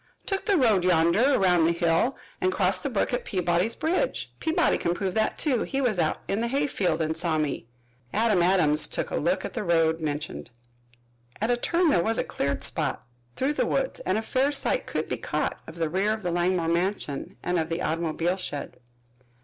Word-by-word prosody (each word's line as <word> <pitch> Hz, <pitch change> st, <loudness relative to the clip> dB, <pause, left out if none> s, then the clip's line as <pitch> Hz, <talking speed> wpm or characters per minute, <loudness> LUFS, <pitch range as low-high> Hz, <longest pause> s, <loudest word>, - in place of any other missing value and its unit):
"Took 390 Hz, -1 st, -2 dB
the 400 Hz, -3 st, +4 dB
road 220 Hz, -, +3 dB
yonder, 180 Hz, +10 st, +4 dB
around 180 Hz, -4 st, +4 dB
the 165 Hz, -, +3 dB
hill, 170 Hz, +9 st, +1 dB, 0.2 s
and 185 Hz, -, +2 dB
crossed 185 Hz, -1 st, +1 dB
the -, -, -2 dB
brook 230 Hz, 0 st, -1 dB
at 245 Hz, -, -1 dB
Peabody's 180 Hz, +3 st, 0 dB
bridge 355 Hz, +10 st, -1 dB
Peabody 320 Hz, 0 st, +2 dB
can 170 Hz, 0 st, 0 dB
prove 190 Hz, 0 st, -2 dB
that, 220 Hz, +1 st, 0 dB
too. 265 Hz, -7 st, +1 dB
He 275 Hz, -, -2 dB
was 240 Hz, -8 st, +1 dB
out 155 Hz, -2 st, 0 dB
in 200 Hz, +3 st, -1 dB
the 235 Hz, -, 0 dB
hayfield 235 Hz, -, 0 dB
and 160 Hz, +1 st, -1 dB
saw 160 Hz, -2 st, +1 dB
me." 150 Hz, -6 st, -2 dB, 0.4 s
Adam 215 Hz, -4 st, +2 dB
Adams 170 Hz, -4 st, +3 dB
took -, -, -3 dB
a -, -, -1 dB
look -, -, 0 dB
at -, -, -6 dB
the 240 Hz, -, -3 dB
road 165 Hz, -2 st, +2 dB
mentioned. 150 Hz, -4 st, -4 dB, 0.9 s
At 220 Hz, +3 st, +1 dB
a -, -, +4 dB
turn 335 Hz, +6 st, +2 dB
there 175 Hz, -, +3 dB
was 225 Hz, +3 st, 0 dB
a -, -, +1 dB
cleared 140 Hz, 0 st, -2 dB
spot -, -, -1 dB, 0.3 s
through 270 Hz, +3 st, 0 dB
the -, -, 0 dB
woods -, -, -1 dB
and -, -, -1 dB
a 220 Hz, -, -2 dB
fair 265 Hz, +5 st, +1 dB
sight 290 Hz, -, 0 dB
could -, -, -2 dB
be -, -, -2 dB
caught -, -, -2 dB
of -, -, -9 dB
the 165 Hz, -1 st, -1 dB
rear 190 Hz, +6 st, +1 dB
of 220 Hz, -1 st, -6 dB
the 175 Hz, -, -1 dB
Langmore 175 Hz, 0 st, +1 dB
mansion 175 Hz, -1 st, -2 dB
and 180 Hz, -1 st, 0 dB
of 160 Hz, 0 st, -2 dB
the 165 Hz, +1 st, -2 dB
automobile 165 Hz, +2 st, -1 dB
shed. 145 Hz, -6 st, -6 dB
185 Hz, 205 wpm, -26 LUFS, 165-235 Hz, 0.9 s, the